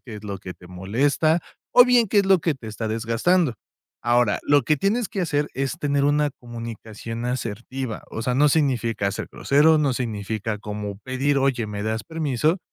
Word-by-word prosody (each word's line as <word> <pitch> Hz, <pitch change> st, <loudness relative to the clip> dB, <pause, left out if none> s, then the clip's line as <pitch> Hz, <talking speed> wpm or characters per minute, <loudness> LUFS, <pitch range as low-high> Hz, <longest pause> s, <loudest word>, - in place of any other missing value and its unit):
qué 115 Hz, -4 st, -9 dB
es 105 Hz, -, -11 dB
lo 100 Hz, -1 st, -5 dB
que 90 Hz, 0 st, -8 dB
te 90 Hz, -, -16 dB
molesta, 130 Hz, -, +1 dB, 0.3 s
o 245 Hz, -, +9 dB
bien, 245 Hz, -3 st, +4 dB
qué 205 Hz, -, +3 dB
es 200 Hz, -, +3 dB
lo 190 Hz, -2 st, +5 dB
que 160 Hz, -1 st, 0 dB
te 120 Hz, -, -11 dB
está 110 Hz, +1 st, -4 dB
desgastando. 115 Hz, +8 st, +1 dB, 0.5 s
Ahora 120 Hz, -3 st, +2 dB
lo 145 Hz, -2 st, +4 dB
que 155 Hz, +6 st, +2 dB
tienes 205 Hz, -, 0 dB
que 195 Hz, -, -3 dB
hacer 150 Hz, -4 st, 0 dB
es 135 Hz, +4 st, -2 dB
tener 145 Hz, -3 st, 0 dB
una 145 Hz, 0 st, +2 dB
comunicación 115 Hz, -1 st, -7 dB
asertiva. 125 Hz, 0 st, -4 dB
O -, -, -5 dB
sea, 125 Hz, +1 st, 0 dB
no 145 Hz, +3 st, +5 dB
significa 120 Hz, -9 st, +1 dB
ser -, -, -5 dB
grosero. 155 Hz, +3 st, +4 dB
No 145 Hz, -3 st, +2 dB
significa 110 Hz, -2 st, -3 dB
como 105 Hz, -1 st, -5 dB
pedir: 135 Hz, +4 st, 0 dB
"Oye, 135 Hz, -4 st, +1 dB
me 105 Hz, -1 st, -4 dB
das 110 Hz, 0 st, -2 dB
permiso". 155 Hz, -, 0 dB
125 Hz, 190 wpm, -23 LUFS, 110-150 Hz, 0.5 s, o